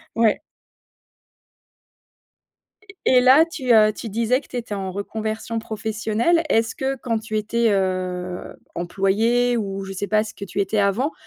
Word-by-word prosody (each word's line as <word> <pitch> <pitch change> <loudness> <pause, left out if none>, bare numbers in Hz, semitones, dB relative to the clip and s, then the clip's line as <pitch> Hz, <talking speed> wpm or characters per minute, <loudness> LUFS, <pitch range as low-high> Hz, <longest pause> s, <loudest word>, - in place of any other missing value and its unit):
Ouais. 225 -2 +2 2.5
E 380 - -11
Et 255 - +6
là 260 +5 +7
tu, 270 -7 -1
heu 215 -1 +6
tu 225 - -7
disais 230 +4 +1
que - - -20
tu 250 - -7
étais 230 -3 -4
en 190 -2 -4
reconversion 220 +3 -4
professionnelle. 220 +8 0
Est-ce 225 0 +1
que 270 0 -2
quand 230 -3 -2
tu 215 0 -5
étais, 230 +2 +1
heu 205 - +3 0.2
heu, 180 -1 -5 0.2
employée 220 +7 +1
ou 195 -3 -3
je 195 - -7
sais 195 +2 -3
pas, 215 0 +2
ce 220 - -9
que 200 - -7
tu 195 +1 -3
étais 200 +2 0
avant, 205 +9 +1
220 Hz, 165 wpm, -22 LUFS, 200-235 Hz, 2.5 s, là